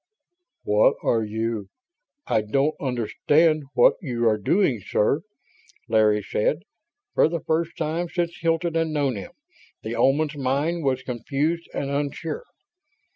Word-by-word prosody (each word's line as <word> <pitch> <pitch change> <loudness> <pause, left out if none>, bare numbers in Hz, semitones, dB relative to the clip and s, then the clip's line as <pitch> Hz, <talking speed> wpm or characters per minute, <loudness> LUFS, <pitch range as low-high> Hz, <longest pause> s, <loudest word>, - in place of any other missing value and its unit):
"What 105 +1 +4
are 115 -1 +2
you... 110 -1 -3 0.6
I - - +2
don't 135 +8 +1
understand 145 +5 +1
what 120 - +5
you 120 -6 -1
are 110 -1 +2
doing, 130 - +2
sir," 135 +11 +1 0.7
Larry 105 -2 +3
said. 145 - 0 0.5
For - - +4
the 170 0 -3
first 165 +1 -1
time 165 +2 -2
since 170 -1 -2
Hilton 165 0 0
had 165 0 +1
known 145 -5 0
him, 100 - -8 0.5
the 110 +2 -4
Oman's 145 +6 +2
mind 145 +5 -1
was 130 -1 0
confused 140 +7 -2
and 140 0 -2
unsure. 145 - -3
140 Hz, 130 wpm, -24 LUFS, 115-160 Hz, 0.7 s, what